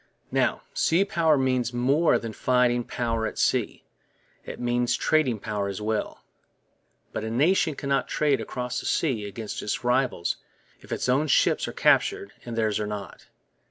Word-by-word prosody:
Now, - - +1
sea 175 +5 +2
power 165 -7 +2
means 130 -2 0
more 140 +7 +3
than 115 -1 -6
fighting 125 0 +2
power 115 -2 -2
at - - -7
sea; - - 0 0.6
it - - -8
means 120 0 +1
trading 145 -7 +2
power 105 -1 -3
as 100 0 -4
well. 105 0 -3 0.9
But - - -3
a 110 - -3
nation 155 +6 +2
cannot 140 0 -1
trade 145 -3 +1
across 125 -1 -4
the - - -5
sea 120 -10 0
against 105 +2 -6
its 105 - -3
rivals 125 -7 +1 0.4
if - - -16
its - - -2
own 135 +5 +2
ships 135 - +3
are - - -4
captured 100 - +2
and 120 -1 -6
theirs 110 -2 +1
are 105 - -2
not. 105 -2 -7
125 Hz, 160 wpm, -26 LUFS, 110-135 Hz, 0.9 s, more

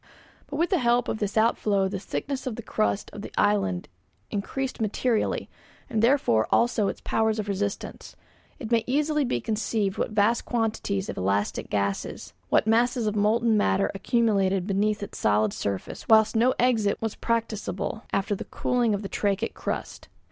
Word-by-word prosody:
But 285 - -6
with 340 +6 0
the 370 - +3
help 240 0 +2
of - - -2
this 205 0 -2
outflow 210 -3 +2
the 195 0 -4
thickness 265 +6 -4
of 240 - -2
the 235 - -7
crust 100 - -1
of - - -7
the - - -8
island 95 -3 +1 0.4
increased 255 +6 -3
materially, 220 +2 0 0.4
and 220 -2 +1
therefore 230 - +3
also 235 -3 +2
its - - -4
powers 220 0 +1
of 210 -1 -3
resistance. 200 0 -4 0.4
It 235 -4 -7
may 230 -1 +3
easily 300 +3 +1
be 180 - 0
conceived 215 - -1
what - - 0
vast 215 +2 +2
quantities 215 -4 -1
of - - -5
elastic 100 +2 -1
gases, 100 -1 -2 0.2
what - - +3
masses 235 +1 +2
of 210 0 0
molten 220 +2 +3
matter 95 - +2
accumulated 195 -3 +1
beneath 205 +1 0
its - - -7
solid 105 0 +2
surface 100 -2 -4
whilst 220 0 +5
no 245 +3 +3
exit 225 -5 +2
was 225 -1 -2
practicable 225 -2 -2
after 195 +2 0
the 200 - -4
cooling 240 -4 0
of 200 - -5
the - - -3
trachytic 205 +2 -1
crust. - - -5
215 Hz, 170 wpm, -26 LUFS, 195-235 Hz, 0.4 s, whilst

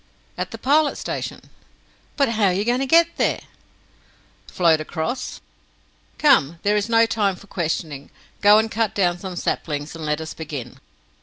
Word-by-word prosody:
"At - - -4
the - - -8
Pilot 295 +2 +2
Station." - - -5 0.8
"But 275 -4 +3
how 220 -2 +1
are 185 - +3
you 200 +3 -1
going 245 +2 +1
to 270 - -1
get 335 +3 +4
there?" - - +1 1.1
"Float 165 -3 +2
across. 160 +11 -4 0.8
Come, 170 - +4
there 205 +1 +2
is 210 +2 0
not 230 0 +5
time 200 -4 +1
for 190 - -15
questioning! 160 -6 -3 0.3
Go 205 +1 +7
and 220 0 +1
cut 225 -1 -1
down 175 -3 +1
some 185 -1 -6
saplings, 150 -3 -3
and 165 - -8
let 150 0 -1
us 160 0 -6
begin!" 145 -7 -7
195 Hz, 165 wpm, -22 LUFS, 160-230 Hz, 1.1 s, Go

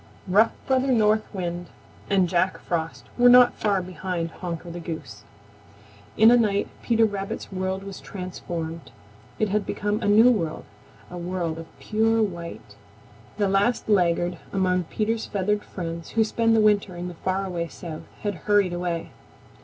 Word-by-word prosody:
Rough 210 +5 +4
Brother 265 0 +2
North 215 -2 +2
Wind 175 -2 -4 0.4
and 190 -2 +3
Jack 180 +2 +1
Frost 165 -2 -3
were 245 0 +7
not 250 0 +8
far 200 -3 0
behind 180 -2 -4
Honker 170 -1 -6
the 175 - -6
Goose. 155 -11 -7 1.0
In 220 +2 +8
a 245 - +7
night 205 -3 +1
Peter 230 -1 +3
Rabbit's 200 -2 -4
world 190 0 -2
was 195 -1 -8
transformed. 170 -5 -6 0.5
It 215 - +1
had 210 +1 +1
become 210 +2 -2
a 205 - -1
new 220 +4 +7
world, 170 -9 -2 0.5
a 180 - -6
world 175 -2 -3
of 165 - -8
pure 225 +1 +1
white. 170 - -6 0.6
The 205 -2 +2
last 200 +5 +1
laggard 175 -3 +2
among 185 -2 +1
Peter's 220 +5 -2
feathered 205 +1 0
friends 170 -2 -6
who 225 - +6
spend 225 +1 +2
the 220 - +4
winter 205 -3 +2
in 175 +1 -5
the 180 - -6
far 185 +3 -2
away 175 -3 -3
South 165 -2 -8 0.2
had 205 -1 0 0.2
hurried 200 -3 +4
away. 175 -1 -3
190 Hz, 160 wpm, -25 LUFS, 175-210 Hz, 1.0 s, not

